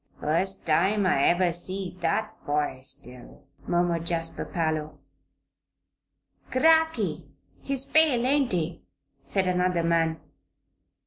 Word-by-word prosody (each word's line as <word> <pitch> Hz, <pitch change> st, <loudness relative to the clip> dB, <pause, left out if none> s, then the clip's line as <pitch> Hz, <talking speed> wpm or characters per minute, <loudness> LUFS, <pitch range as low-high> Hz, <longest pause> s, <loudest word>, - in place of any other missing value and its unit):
"Fust 180 Hz, +6 st, -1 dB
time 195 Hz, +6 st, +2 dB
I 140 Hz, -7 st, +3 dB
ever 175 Hz, 0 st, +3 dB
see 185 Hz, +1 st, -2 dB
that 165 Hz, -2 st, -1 dB
boy 145 Hz, -2 st, -1 dB
still," 130 Hz, -2 st, -6 dB, 0.2 s
murmured 175 Hz, -1 st, 0 dB
Jasper 165 Hz, -1 st, -1 dB
Parloe. 155 Hz, -3 st, -2 dB, 1.5 s
"Cracky! 320 Hz, +4 st, +2 dB, 0.3 s
He's 275 Hz, -1 st, -2 dB
pale; 275 Hz, -5 st, +3 dB
ain't 275 Hz, -1 st, +2 dB
he?" 170 Hz, -2 st, -2 dB, 0.4 s
said 195 Hz, -2 st, 0 dB
another 180 Hz, -1 st, +1 dB
man. 165 Hz, -1 st, +1 dB
175 Hz, 105 wpm, -26 LUFS, 160-200 Hz, 1.5 s, I